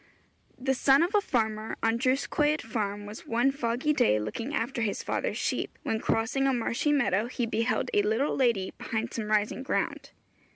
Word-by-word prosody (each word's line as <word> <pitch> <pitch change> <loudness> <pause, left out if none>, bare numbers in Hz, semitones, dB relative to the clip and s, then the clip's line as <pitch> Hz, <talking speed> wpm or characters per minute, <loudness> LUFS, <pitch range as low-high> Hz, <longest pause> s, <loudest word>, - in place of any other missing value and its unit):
The 265 +1 0
son 270 +3 +4
of 355 +5 -1
a 415 - +4
farmer 220 - -1
on 225 +1 +2
Drws 260 +1 +1
Coed 300 0 +1
farm 205 -2 -3
was 210 +2 -9
one 240 +4 +2
foggy 265 +2 0
day 105 - +3
looking 110 - -4
after 240 -3 -2
his 215 -3 -1
father's - - -2
sheep, - - -2
when 220 - -1
crossing 225 +5 +1
a 270 - +2
marshy 240 +5 0
meadow 235 -7 +2
he 245 -1 -2
beheld 230 +2 0
a 205 - +4
little 220 +8 +1
lady 235 -8 +1
behind 225 +1 -3
some 220 -2 -3
rising 215 +3 +1
ground. 265 - -2
230 Hz, 180 wpm, -28 LUFS, 220-270 Hz, -, son